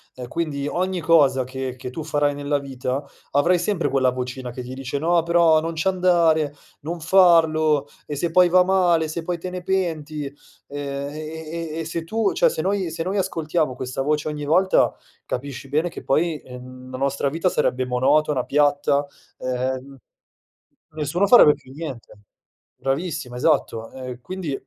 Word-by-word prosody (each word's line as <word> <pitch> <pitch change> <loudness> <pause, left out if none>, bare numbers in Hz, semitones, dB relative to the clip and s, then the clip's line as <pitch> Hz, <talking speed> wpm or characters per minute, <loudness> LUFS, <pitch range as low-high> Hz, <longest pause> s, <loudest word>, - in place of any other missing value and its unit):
Ehm, 125 -1 -7
quindi 145 -1 -3
ogni 185 +2 -1
cosa 145 -6 +4
che 130 -1 -5
che 125 0 -6
tu 155 +4 -6
farai 145 -2 0
nella 145 0 -1
vita, 135 0 -3 0.3
avrai 170 +6 +3
sempre 175 -3 0
quella 130 -2 +2
vocina 125 0 -5
che 125 - -7
ti 125 +1 -7
dice: 135 +1 -4
"No 170 +2 +2
però 170 -2 +4
non 165 +1 -3
ci 165 +4 -2
andare, 170 -5 +3 0.3
non 170 +4 -5
farlo 160 -4 +4 0.2
e 145 - -5
se 170 - 0
poi 180 0 +5
va 180 +1 +6
male, 175 -4 +3
se 160 +2 -4
poi 175 0 -2
te 180 +2 -6
ne 180 0 -6
penti?" 160 -6 -2 0.4
Ehm, 140 -1 -4
e - - -10
e 160 +1 -6
e - - -3
e 165 - -3
se 165 +1 -4
tu 220 +5 0
cioè - - +4
se 485 - -3
noi 195 -3 0
se 165 +1 -3
noi 190 +4 -2
ascoltiamo 165 -6 -1
questa 130 +1 -4
voce 150 +2 0
ogni 150 -1 -4
volta, 180 +6 +3 0.3
capisci 135 +1 -5
bene 155 +5 +1
che - - -9
poi, 155 +2 +1
ehm, 130 0 -11
la 130 - -5
nostra 140 +1 0
vita 165 +5 -1
sarebbe 130 -7 +1
monotona, 135 +2 +2
piatta, 145 0 +2 0.3
e - - -6
ehm, 130 +2 -3 0.9
nessuno 155 +5 0
farebbe 200 -9 +8
più 130 - -16
niente. 135 -5 -7 0.6
Bravissima, 135 -2 -3
esatto. 115 -2 +1
Ehm, 125 -2 -7
quindi, 185 0 -5
150 Hz, 175 wpm, -22 LUFS, 135-170 Hz, 0.9 s, farebbe